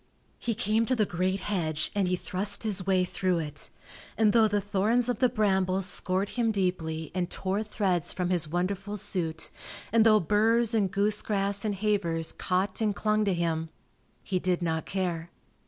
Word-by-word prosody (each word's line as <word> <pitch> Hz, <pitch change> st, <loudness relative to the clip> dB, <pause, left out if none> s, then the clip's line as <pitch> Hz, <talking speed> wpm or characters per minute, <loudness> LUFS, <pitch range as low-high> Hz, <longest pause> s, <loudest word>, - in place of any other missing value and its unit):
He 230 Hz, -2 st, -2 dB
came 225 Hz, 0 st, +1 dB
to 260 Hz, -, +2 dB
the 215 Hz, -3 st, +2 dB
great 185 Hz, +1 st, -1 dB
hedge 160 Hz, -7 st, -1 dB
and 200 Hz, -2 st, +1 dB
he 180 Hz, -, +1 dB
thrust 200 Hz, +4 st, -2 dB
his 200 Hz, -4 st, -2 dB
way 185 Hz, -1 st, +3 dB
through 180 Hz, 0 st, 0 dB
it, 150 Hz, -3 st, -4 dB, 0.5 s
and 215 Hz, -2 st, +4 dB
though 225 Hz, -2 st, +6 dB
the 205 Hz, -1 st, +1 dB
thorns 205 Hz, +5 st, +1 dB
of 245 Hz, -, -1 dB
the 255 Hz, -, +4 dB
brambles 190 Hz, -4 st, +1 dB
scored 185 Hz, +1 st, -1 dB
him 235 Hz, -2 st, 0 dB
deeply 175 Hz, -6 st, -1 dB
and 180 Hz, -2 st, -1 dB
tore 195 Hz, +3 st, -1 dB
threads 195 Hz, -6 st, -1 dB
from 180 Hz, -1 st, -2 dB
his 170 Hz, -3 st, +2 dB
wonderful 195 Hz, +5 st, -2 dB
suit, 165 Hz, -4 st, -2 dB, 0.4 s
and 230 Hz, -1 st, +6 dB
though 215 Hz, -1 st, +6 dB
burs 225 Hz, +5 st, +2 dB
and 205 Hz, -4 st, +2 dB
goosegrass 200 Hz, -1 st, 0 dB
and 205 Hz, -2 st, 0 dB
havers 185 Hz, -6 st, 0 dB
caught 190 Hz, +3 st, -1 dB
and 210 Hz, -2 st, +1 dB
clung 215 Hz, 0 st, +1 dB
to 195 Hz, -, +2 dB
him, 165 Hz, -1 st, -1 dB, 0.5 s
he 185 Hz, -, -1 dB
did 180 Hz, -1 st, 0 dB
not 160 Hz, -1 st, -1 dB
care. 175 Hz, -3 st, -2 dB
195 Hz, 175 wpm, -28 LUFS, 180-210 Hz, 0.5 s, though